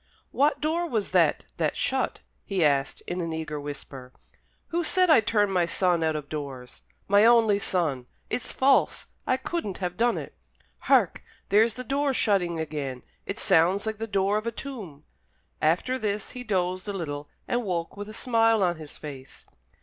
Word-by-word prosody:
"What 290 +2 +2
door 330 +3 0
was 220 -6 -1
that - - +3
that - - 0
shut?" - - -1 0.2
he 190 -5 +1
asked, 140 -1 +1
in 180 +1 -3
an 165 -1 -3
eager 155 -2 -4
whisper. 140 -3 -8 0.6
"Who 345 +1 0
said 365 +1 +4
I 310 - +8
turned 210 -2 +1
my 175 -2 +2
son 175 -1 +2
out 160 -1 +1
of 150 -2 -5
doors 135 -5 -7 0.3
my 200 +1 +5
only 225 -3 +5
son? 155 -11 -1 0.2
It's 250 - -3
false! 270 +1 +2 0.2
I 255 - +3
couldn't 260 - -3
have 180 -1 -4
done 240 +1 +2
it! - - -7 0.5
Hark! - - +2 0.3
there's 220 +2 +4
the 255 - -5
door 275 +2 0
shutting 180 -7 +1
again! 145 -5 -4 0.2
It - - -3
sounds 185 +6 +3
like 220 -1 -3
the 225 - -3
door 200 0 +1
of 220 - -7
a - - 0
tomb." 220 - -8 0.6
After 180 +12 +1
this 210 -2 -2
he 250 - -7
dozed 185 -3 -1
a 205 - -2
little, 145 -6 -5 0.2
and 245 0 0
woke 175 -5 -3
with 205 +1 -7
a 215 - -9
smile 225 -3 +3
on 175 -2 +1
his 155 -2 -10
face. 140 -3 -10
195 Hz, 180 wpm, -26 LUFS, 160-230 Hz, 0.6 s, I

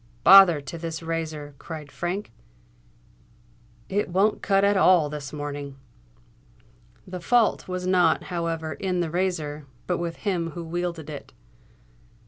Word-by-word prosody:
"Bother 190 -6 +8
to 140 +4 -8
this 165 0 -5
razor!" 160 -3 -4
cried 155 -3 -8
Frank: 180 - -4 1.6
"it 205 0 -1
won't 195 +4 +2
cut 195 0 +2
at 200 0 +4
all 180 -6 +4
this 145 -2 -6
morning!" 145 -2 -6 1.3
The 180 -1 -7
fault 235 +4 +2
was 185 0 -4
not, 180 -3 +3
however, 165 -2 -2
in 180 0 -2
the 165 -2 -2
razor, 155 -5 -2 0.2
but 180 - -1
with 170 -1 -3
him 180 -5 -2
who 170 - -4
wielded 170 -1 -4
it. 150 -2 -9
170 Hz, 130 wpm, -25 LUFS, 155-185 Hz, 1.6 s, Bother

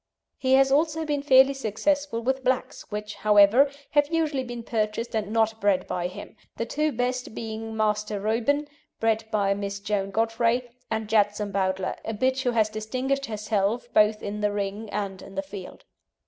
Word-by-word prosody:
He 260 0 +2
has 270 0 +5
also 315 +2 +2
been 295 -2 -1
fairly 270 -1 +6
successful 270 +2 -1
with 265 +2 0
blacks, 260 0 -1
which, 210 0 -5
however, 210 +6 +5 0.2
have 290 -1 +4
usually 310 -5 0
been 240 -2 -6
purchased 225 +1 -2
and 210 -1 -2
not 220 0 +1
bred 195 -2 +2
by 175 -1 -2
him, 180 - -10 0.2
the 230 - -1
two 300 +5 0
best 250 -1 -2
being 225 0 -5
Master 210 -1 0
Reuben, 235 +8 0 0.3
bred 225 0 +1
by 200 -3 +2
Miss 200 0 -4
Joan 200 -1 -1
Godfrey, 230 +3 +1 0.2
and 220 -1 -2
Jetsam 210 -1 +1
Bowdler, 190 -1 -1
a 225 - -4
bitch 260 +4 +1
who 255 - +1
has 225 -3 +3
distinguished 255 +6 -2
herself 215 +2 -1
both 215 0 +4
in 210 +1 -4
the 210 0 +1
ring 205 +1 -3
and 195 -2 -4
in 195 - -12
the 195 - -2
field. 190 -1 -10
220 Hz, 175 wpm, -26 LUFS, 205-260 Hz, 0.3 s, fairly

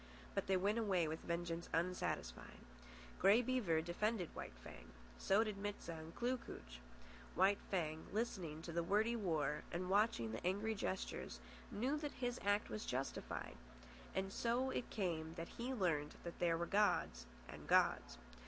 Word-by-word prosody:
But - - -1
they 190 -1 +4
went 205 +5 +2
away 190 -7 +2
with 160 +1 -3
vengeance 170 0 -2
unsatisfied. 165 - -2 0.6
Grey 205 +6 +6
Beaver 225 -11 +2
defended 180 +2 0
White - - -6
Fang. - - -10 0.3
So 200 +3 +4
did 215 -3 -3
Mit 205 0 -2
sah - - -6
and 160 0 -8
Kloo 250 +2 +1
kooch. - - -9 0.6
White 200 +1 +5
Fang, 160 -4 -1
listening 185 -8 -2
to 170 - -5
the 170 +1 +1
wordy 210 +7 +2
war 155 -8 0
and 180 +2 -2
watching 200 - +3
the 110 - -5
angry 200 +5 +1
gestures, 190 -2 -3 0.3
knew 260 +8 0
that 295 -1 -3
his 245 -1 -2
act 205 +1 +3
was 215 - -4
justified. 130 +2 -3 0.6
And 195 +1 -1
so 245 +3 +1
it 245 - -2
came 165 -6 -2
that 165 -1 -5
he 245 +3 -1
learned 165 - +1 0.2
there 170 -1 +3
were 170 - 0
gods 195 - +2 0.2
and - - -9
gods. - - +4
190 Hz, 160 wpm, -40 LUFS, 165-215 Hz, 0.6 s, Grey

